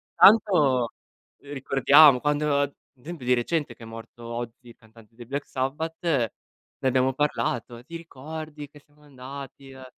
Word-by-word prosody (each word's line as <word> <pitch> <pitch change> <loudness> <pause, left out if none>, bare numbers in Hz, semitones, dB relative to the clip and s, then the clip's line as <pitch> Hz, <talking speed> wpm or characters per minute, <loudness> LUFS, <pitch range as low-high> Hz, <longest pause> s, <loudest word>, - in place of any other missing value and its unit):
tanto, 155 - +5 0.5
uhm, 145 0 -10
ricordiamo, 135 +1 +6
quando 145 -1 0 0.3
d'esempio 160 -6 -8
di 125 - +3
recente, 125 +1 -1
che 115 - -14
è - - -8
morto 115 +1 -11
Ozzy, 120 +1 -7
il - - -14
cantante 110 0 -20
dei 120 -1 -11
Black 140 +4 -4
Sabbath, 150 +5 -3
ne 140 - +1 0.6
abbiamo 130 +1 +2
parlato: 125 -4 -2
"Ti 170 +5 -11
ricordi 155 -1 -9
che 145 - -16
siamo 145 +1 -28
andati, 135 0 -10
eh" 130 -1 -12
135 Hz, 150 wpm, -25 LUFS, 120-150 Hz, 0.6 s, ricordiamo